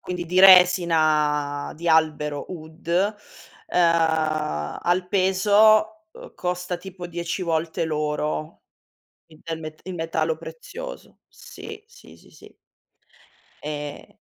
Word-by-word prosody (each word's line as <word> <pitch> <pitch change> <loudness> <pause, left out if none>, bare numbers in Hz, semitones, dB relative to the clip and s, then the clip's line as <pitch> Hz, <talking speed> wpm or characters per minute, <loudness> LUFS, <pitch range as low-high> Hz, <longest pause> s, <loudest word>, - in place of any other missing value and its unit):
quindi 180 -1 -5
di 180 +2 +2
resina 155 -6 +4
di 170 +2 -4
albero 155 -2 +1
oud, 160 -1 -11 0.8
ehm, 160 - +1
al 180 +1 +1
peso, 210 +3 +3
ehm, - - -13
costa 180 0 -3
tipo 185 -1 -9
10 170 +2 -4
volte 165 0 -1
l'oro, 150 0 -3 0.6
il 155 -1 -19
del 165 -1 -5
met 155 0 -9
il 185 - -6
metallo 160 -1 -1
prezioso. - - -10
Sì. 445 -3 -11
Sì, 470 +3 -17
sì, - - -21
sì. - - -17 1.1
E 150 -1 -7
165 Hz, 110 wpm, -23 LUFS, 155-185 Hz, 1.1 s, resina